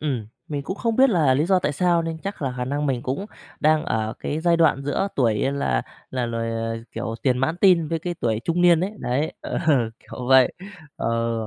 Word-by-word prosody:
Ừm, 130 -8 -2 0.2
mình 145 -2 -3
cũng 190 +7 -5
không 230 0 -1
biết 265 -1 +6
là 150 -9 +3
lý 145 - +2
do 190 -1 +4
tại 180 - -1
sao 170 +2 +2
nên 165 -1 -4
chắc 195 -2 -6
là 130 -2 -2
khả 125 - -2
năng 145 +3 -2
mình 125 -3 -1
cũng 140 +11 -3 0.3
đang 155 0 +3
ở 110 0 -1
cái 150 - -3
giai 170 0 +3
đoạn 160 -4 +3
giữa 145 +8 -1
tuổi 115 -5 +3 0.2
là 140 - 0 0.3
là 125 -2 -1
loài 115 -1 -2
ờ, 115 0 -2 0.2
kiểu, 115 0 -4
tiền 125 -2 +2
mãn 155 +6 0
teen 175 -6 +5
với 165 - -1
cái 175 +2 -4
tuổi 110 -8 -1
trung 175 +1 +1
niên 170 -2 +6
ấy, 190 - -1
đấy. 140 +6 -1
Ờ, - - -3 0.4
kiểu 125 - -8
vậy. 130 -2 +6 0.4
Ờ, 115 0 -1
145 Hz, 225 wpm, -23 LUFS, 125-170 Hz, 0.4 s, biết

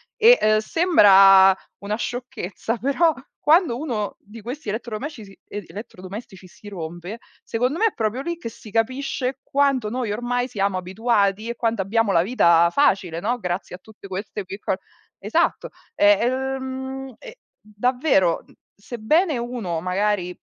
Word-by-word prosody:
E, 475 +2 +7
uhm, 215 0 +4
sembra 195 - +6 0.2
una 205 +1 -3
sciocchezza, 240 -3 -4
però 290 +6 +2 0.3
quando 310 -4 +3
uno 235 -8 -3
di 215 +3 -13
questi 245 +2 -6
elettrodomesci 225 +3 -5
si 195 0 -16
e 205 -3 -6
elettrodomestici 195 -1 -10
si 205 +3 -13
rompe 175 +3 -7 0.3
secondo 250 +8 -1
me 450 - +4
è - - -3
proprio 225 +3 -2
lì 340 +2 -4
che 230 - -6
si 220 - -13
capisce 255 +3 -1
quanto 275 -5 +1
noi 240 -1 -3
ormai 245 +3 -1
siamo 200 -5 -1
abituati 200 +2 0
e 235 - -3
quanto 230 -4 -1
abbiamo 215 +2 +1
la 165 - +5
vita 170 -6 +4
facile, 190 - +1
no, 235 +7 -1
grazie 180 -2 -4
a 180 - -13
tutte 210 -1 -14
queste 195 +1 -5
piccol 195 0 -3 0.4
esatto, 225 - 0 0.3
e - - +2 0.2
ehm, 265 +1 -3
e - - -12 0.2
davvero, 215 - +1
mhmm, - - -22 0.2
sebbene 250 - 0
uno 230 -9 -4
magari, 185 0 0
225 Hz, 145 wpm, -22 LUFS, 195-260 Hz, 0.4 s, E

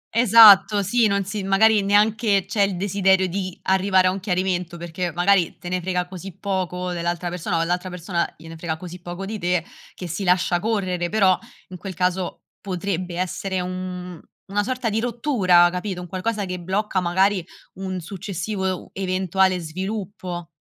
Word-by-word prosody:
Esatto 215 -3 +7
sì, 225 +4 +3
non 200 -1 0
si 205 +2 -4
magari 205 +3 +4
neanche 205 0 +2
c'è 200 +2 -1
il 195 -2 +2
desiderio 190 0 +2
di 185 0 -4
arrivare 190 0 +3
a 185 - +4
un 190 - -4
chiarimento, 180 -2 -1
perché 175 +1 -4
magari 180 0 +2
te 175 - -8
ne 180 0 -1
frega 180 0 -1
così 185 0 -9
poco 180 -2 -2
dell'altra 175 0 -2
persona 175 0 -2
o - - +1
all'altra 180 +2 -1
persona 175 -1 -2
gliene 165 +1 -11
frega 160 -1 -4
così 180 +1 -9
poco 175 +2 -6
di 215 +2 -5
te, 175 -2 0 0.3
che 180 - -7
si 175 +4 -4
lascia 180 -1 +2
correre, 185 -4 -1
però 195 -3 +4 0.3
in 185 - -8
quel 190 0 -7
caso 180 0 -1 0.2
potrebbe 185 -2 -3
essere 185 +1 -2
un 180 -1 -6 0.2
una 200 +1 0
sorta 255 +1 -2
di 215 +1 0
rottura, 225 -8 +3
capito? 180 0 -4
Un 180 - -8
qualcosa 200 +4 -2
che 180 -1 -5
blocca 190 +3 -1
magari 185 +2 +2 0.3
un 185 -1 -4
successivo 190 +2 -4
e - - +1
u 185 - -7
eventuale 190 0 +1
sviluppo. 185 0 -5
185 Hz, 170 wpm, -22 LUFS, 180-200 Hz, 0.3 s, Esatto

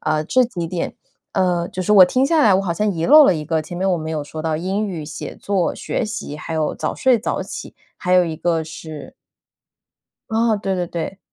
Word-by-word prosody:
呃， 155 0 0
这 255 +9 +3
几 180 -8 -4
点 170 +1 -3 0.4
呃， 175 -2 +1
就 185 - -4
是 210 - +1
我 190 -3 +9
听 255 +8 +1
下 315 -1 +3
来， 200 -3 +5
我 190 - +3
好 175 - -1
像 210 +5 0
遗 165 -3 -2
漏 300 +1 +9
了 185 - +4
一 155 - -4
个， 160 +1 0
前 175 +3 -8
面 190 +2 0
我 180 - +2
们 160 0 -5
有 150 -2 -3
说 155 +2 -7
到 160 -1 -1
英 195 +5 -2
语、 165 -5 -5
写 150 - -7
作、 195 -4 -1
学 245 - -3
习， 205 -8 -5
还 160 +1 -6
有 155 -1 0
早 - - -3
睡 255 -3 +3
早 215 - -2
起， - - -8 0.2
还 180 - -2
有 180 -1 +5
一 160 -1 -3
个 165 -1 0
是 155 -1 -9 1.2
哦， 225 -1 +2
对 195 -2 -2
对 175 -1 -1
对， 170 +3 -5
180 Hz, 250 characters per minute, -20 LUFS, 160-205 Hz, 1.2 s, 我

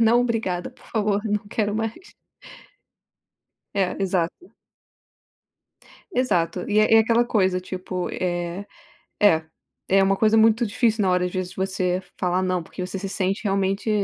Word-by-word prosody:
Não, 230 +2 +5
obrigada, 225 -6 -1
por - - -22
favor, 210 -2 0
não 210 -1 -1
quero 210 -1 -1
mais. 225 - -4 1.6
É 190 -2 0
exato. 190 - -1 1.6
Exato 180 - 0
e 210 0 +2
é 215 +1 +5
é 225 - +8
aquela 230 +2 +3
coisa 190 -5 +1
tipo, 185 0 -4
eh, 175 +1 -3 0.6
é 165 -6 +4 0.4
é 195 +1 +4
uma 195 0 +3
coisa 220 +2 +3
muito 225 +2 +4
difícil 220 0 +1
na 185 - +2
hora, 180 0 +2
às - - -4
vezes 185 -1 -4
você 185 -1 -1 0.2
falar 180 +1 +1
não, 185 -2 0
porque 180 +2 -7
você 185 +1 -5
se 195 - -5
sente 195 +2 -1
realmente, 195 +1 0
195 Hz, 150 wpm, -23 LUFS, 185-220 Hz, 1.6 s, é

